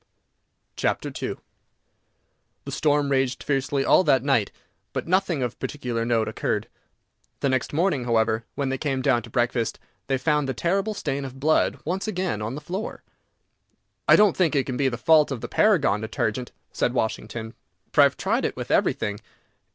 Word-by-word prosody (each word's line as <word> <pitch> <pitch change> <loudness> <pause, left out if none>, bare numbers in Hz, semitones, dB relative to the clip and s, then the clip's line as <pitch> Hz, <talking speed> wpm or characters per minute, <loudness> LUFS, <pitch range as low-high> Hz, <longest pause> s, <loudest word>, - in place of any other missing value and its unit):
II - - +4 1.7
The - - -5
storm 145 -1 +1
raged 135 -1 0
fiercely 135 0 0
all - - +5
that 130 -2 +4
night, 135 -7 +2 0.4
but - - -3
nothing 180 -5 +1
of 120 -1 -4
particular 125 -6 -3
note 115 -2 +1
occurred. - - -2 0.7
The 140 - +2
next 130 -1 0
morning, 155 -5 +1
however, 110 -1 +1
when 140 -2 -1
they 135 0 -2
came 135 -4 -1
down 120 - +3
to 115 - -12
breakfast, 120 -1 0 0.3
they 135 0 +1
found 150 0 +1
the 130 - -2
terrible 195 - 0
stain 140 -7 -2
of 135 0 -8
blood 155 +3 +2
once 185 +6 -2
again 180 - -2
on 110 +4 -3
the 150 - -6
floor. 190 +7 -5 1.0
"I - - +8
don't 210 -2 +5
think 165 -5 +2
it 135 -2 +2
can 130 - -3
be 135 +1 +2
the 120 - -4
fault 155 0 +4
of 135 - -3
the - - -4
Paragon 185 - +3
Detergent," 115 +2 -2 0.2
said 120 - 0
Washington, 110 0 -3 0.4
"for - - +6
I - - +9
have - - 0
tried - - 0
it - - -1
with - - -5
everything. 105 0 +1
135 Hz, 175 wpm, -25 LUFS, 120-155 Hz, 1.7 s, I